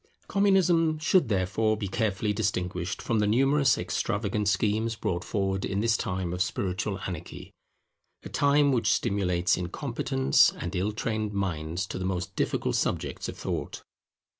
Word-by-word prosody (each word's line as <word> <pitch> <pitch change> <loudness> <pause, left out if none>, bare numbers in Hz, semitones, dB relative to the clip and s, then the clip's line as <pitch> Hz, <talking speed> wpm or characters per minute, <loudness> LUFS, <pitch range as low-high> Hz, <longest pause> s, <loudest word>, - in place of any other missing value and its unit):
Communism 180 -5 +3
should 155 -2 +2
therefore 105 +2 +1
be 105 - -3
carefully 105 0 -1
distinguished 90 -3 -2
from 115 -2 0
the 105 - +2
numerous 135 +5 +3
extravagant 105 0 -1
schemes 110 +3 +1
brought 90 -5 -2
forward 95 -2 -1
in 100 - -1
this 115 +1 +2
time 90 -2 -2
of 90 - -3
spiritual 95 +1 -1
anarchy; 85 -3 -7 0.7
a - - -8
time 145 0 +3
which 125 -3 +2
stimulates 90 -3 +1
incompetent 70 -6 +2
and 90 +3 -5
ill 95 +4 0
trained 110 -1 -2
minds 90 -2 -2
to 95 - -6
the 95 - -3
most 90 -1 -3
difficult - - 0
subjects - - -2
of - - -7
thought. - - -4
100 Hz, 145 wpm, -27 LUFS, 90-115 Hz, 0.7 s, Communism